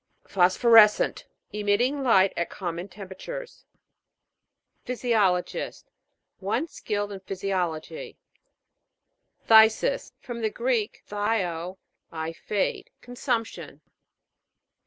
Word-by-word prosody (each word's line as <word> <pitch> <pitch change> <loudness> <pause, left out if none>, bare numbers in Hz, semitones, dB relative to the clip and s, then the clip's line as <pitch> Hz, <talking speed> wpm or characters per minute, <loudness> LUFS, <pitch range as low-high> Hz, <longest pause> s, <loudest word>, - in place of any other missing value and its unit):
PHOSPHORES'CENT. 210 +4 +5 0.3
Emitting 210 +7 +1
light 195 -7 +4
at 170 - -2
common 175 -1 -5
temperatures. 205 - -9 1.2
PHYSIO'LOGIST. 220 -8 -1 0.5
One 210 +10 -1
skilled 205 -8 -3
in 195 - -6
phy 190 +1 -6
siology. 190 - -3 1.3
PHTHI'SIS. 220 - +5
From 240 -2 -7
the 220 - +1
Greek, 235 -1 -1
phthio, 190 -4 -2 0.3
I 160 0 -4
fade. 200 +4 -2
Consumption. 245 -2 -4
210 Hz, 80 wpm, -26 LUFS, 185-235 Hz, 1.3 s, PHOSPHORES'CENT